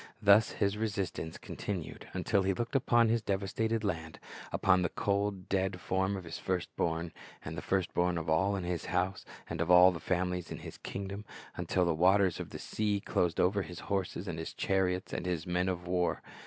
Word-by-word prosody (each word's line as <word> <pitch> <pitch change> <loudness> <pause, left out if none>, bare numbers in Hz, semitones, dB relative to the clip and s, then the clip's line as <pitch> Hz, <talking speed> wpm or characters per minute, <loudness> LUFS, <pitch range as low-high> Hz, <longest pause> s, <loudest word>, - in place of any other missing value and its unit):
Thus 105 +1 +5
his 100 0 0
resistance 100 -7 -2
con - - -9
tinued, 95 -6 -4
until 100 +2 +1
he 95 0 +1
looked 120 +5 -3
upon 120 -3 +4
his 115 0 +2
devastated 105 +3 -1
land, 80 -5 -3 0.3
upon 95 -1 +3
the 90 - +1
cold, 100 -2 -1
dead 95 -1 0
form 95 +2 0
of 95 - -7
his 80 -1 -6
first 95 -2 -2
born, 80 0 -1 0.3
and 75 - -5
the - - -4
first 95 -2 0
born 90 0 +1
of 85 - -4
all 95 +6 +2
in 95 - -3
his 85 -1 -2
house 90 +1 -1 0.2
and 85 0 -3
of 85 - -1
all 90 +1 +8
the 85 - -5
families 90 +1 -1
in - - -5
his - - -9
kingxlom, 100 +1 -5 0.3
until 90 -1 +1
the 85 - +2
waters 95 +2 +4
of - - -5
the - - -7
sea 105 -2 -1
closed 90 -3 0
over 100 +3 +3
his 90 -2 -7
horses 95 -1 -2
and 85 -2 -4
his 80 - -6
chariots 95 -1 0
and 90 - -3
his 85 -3 -1
men 90 +1 0
of 90 -1 -3
war. 90 0 0
95 Hz, 205 wpm, -32 LUFS, 90-100 Hz, 0.3 s, all